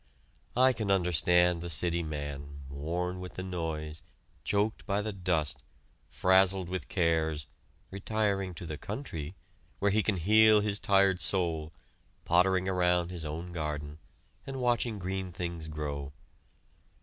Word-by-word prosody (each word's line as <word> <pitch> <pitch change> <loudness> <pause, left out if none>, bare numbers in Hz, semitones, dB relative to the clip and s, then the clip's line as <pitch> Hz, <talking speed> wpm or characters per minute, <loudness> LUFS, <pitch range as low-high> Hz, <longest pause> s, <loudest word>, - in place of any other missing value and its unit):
I 130 +1 +6
can 110 -4 -3
understand 90 -2 +3
the 85 - -5
city 85 +2 +1
man, 70 -2 -5
worn 90 +6 -3
with 90 0 -8
the 95 - -4
noise, 80 -4 -4 0.4
choked 105 +2 0
by 100 0 +1
the 110 -1 -3
dust, 90 -6 -1 0.5
frazzled 95 -1 +3
with 95 0 -4
cares, 80 -4 +1 0.5
retiring 100 -2 -1
to 90 - -7
the 75 -2 -6
country, 95 - -5 0.4
where 100 0 +2
he 110 +2 +3
can 105 -2 0
heal 110 +4 +6
his 105 -1 0
tired 95 -3 +3
soul, 80 -3 0 0.5
pottering 95 +2 +3
around 90 -1 +2
his 85 -3 -5
own 80 +3 -5
garden, 75 -2 -4 0.5
and 135 -1 -4
watching 120 -2 +1
green 95 0 -3
things 85 -2 -5
grow. 75 -2 -4
90 Hz, 135 wpm, -30 LUFS, 80-100 Hz, 0.5 s, I